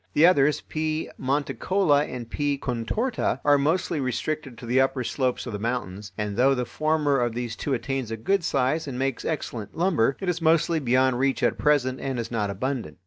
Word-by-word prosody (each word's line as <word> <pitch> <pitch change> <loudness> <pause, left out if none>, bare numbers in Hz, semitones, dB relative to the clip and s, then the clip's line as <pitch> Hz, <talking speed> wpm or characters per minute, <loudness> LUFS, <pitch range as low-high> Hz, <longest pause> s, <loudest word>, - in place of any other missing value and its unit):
The 155 - +6
others 150 -4 +4
(P. 155 0 -3
monticola 145 - +1
and 120 -2 -6
P. 145 +3 -1
contorta) 135 - -1
are 145 -1 +5
mostly 160 +2 0
restricted 135 +1 -3
to - - -9
the 125 +3 +3
upper 135 -1 0
slopes 130 0 -1
of 120 - -5
the 105 - -3
mountains, 105 -4 -3
and 105 -1 -2
though 135 +2 +4
the 125 -1 -1
former 150 +2 +1
of 120 -2 0
these 120 -2 -3
two 140 +1 -1
attains 130 -1 -3
a 115 - -4
good 195 - +1
size 145 +3 0
and 130 -3 -5
makes 135 -1 -1
excellent 120 -8 -4
lumber, 165 -8 +2
it 190 - -5
is 175 -1 -1
mostly 165 0 +3
beyond 130 -1 +2
reach 135 0 +1
at - - +1
present 135 -3 +2
and 135 -2 -3
is 115 0 -4
not 105 -3 -1
abundant. 125 +5 -3
135 Hz, 200 wpm, -25 LUFS, 120-155 Hz, -, The